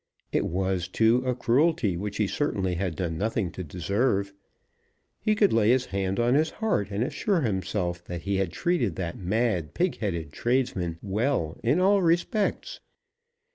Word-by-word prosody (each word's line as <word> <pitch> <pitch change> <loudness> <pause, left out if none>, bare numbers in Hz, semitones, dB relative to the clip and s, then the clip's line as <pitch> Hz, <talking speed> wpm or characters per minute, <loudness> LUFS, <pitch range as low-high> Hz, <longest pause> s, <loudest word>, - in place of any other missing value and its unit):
It - - +1
was, 95 0 -1
too, 115 +6 +3
a 125 - +1
cruelty 130 - +2
which 100 +4 -4
he 105 - +2
certainly 95 -6 -1
had 90 -1 -2
done 80 -3 -3
nothing 105 -4 -1
to 90 - -6
deserve. 100 - 0 0.9
He 215 0 +1
could 210 -2 +3
lay 110 -1 +4
his 125 +1 +3
hand 95 0 -2
on 120 +1 +3
his 155 +3 +3
heart 220 - -1
and 105 +3 -1
assure 185 - 0
himself 95 - -2
that 85 -2 -6
he 100 +1 0
had 95 -3 0
treated 130 - 0
that 85 -3 -4
mad, 95 -4 0
pig 180 0 0
headed 85 -8 -3
tradesman 120 -9 0
well 105 - 0
in 130 +9 +3
all 195 +2 +4
respects. 195 - 0
105 Hz, 165 wpm, -27 LUFS, 90-130 Hz, 0.9 s, lay